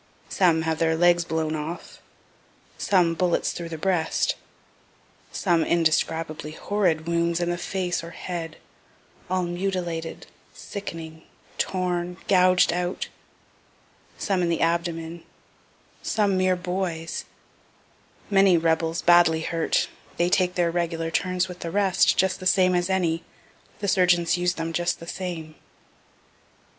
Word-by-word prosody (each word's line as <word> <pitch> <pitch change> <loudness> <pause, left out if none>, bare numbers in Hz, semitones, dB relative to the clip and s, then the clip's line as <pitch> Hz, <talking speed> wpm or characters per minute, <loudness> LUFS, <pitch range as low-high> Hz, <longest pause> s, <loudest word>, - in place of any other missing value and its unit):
Some 165 -4 +3
have 160 -1 -1
their 160 -1 +2
legs 175 +1 +4
blown 160 -1 -1
off 155 +3 -6 0.8
some 180 -4 +3
bullets 175 0 +1
through 170 -1 -6
the 160 - -5
breast 170 -1 +1 1.0
some 170 -4 +1
indescribably 160 -2 0
horrid 175 -4 0
wounds 170 0 +1
in 175 0 0
the 175 - -2
face 180 -1 -2
or 165 - -7
head, 170 -2 -6 0.7
all 185 0 +1
mutilated, 175 -2 -3 0.3
sickening, 165 -5 -7 0.4
torn, 180 -1 -1
gouged 185 -2 +4
out 180 +1 -2 1.1
some 195 -3 0
in 175 - +1
the 165 - 0
abdomen 170 0 -1 0.8
some 205 -3 +1
mere 185 0 +2
boys 180 -2 -3 1.0
many 195 -3 +5
rebels, 165 0 0
badly 170 -2 +5
hurt 165 0 0 0.3
they 175 +1 +2
take 180 -1 +2
their 175 -1 +2
regular 165 -1 -2
turns 185 +2 0
with 180 -1 -9
the 170 - -4
rest, 195 0 +3
just 190 0 +2
the 185 - -1
same 185 -1 +4
as 175 +1 +1
any 175 -3 0 0.6
the 200 - -1
surgeons 180 -3 +3
use 180 0 0
them 165 0 -4
just 175 +1 0
the 170 - -9
same. 170 -3 -5
175 Hz, 130 wpm, -25 LUFS, 165-185 Hz, 1.1 s, many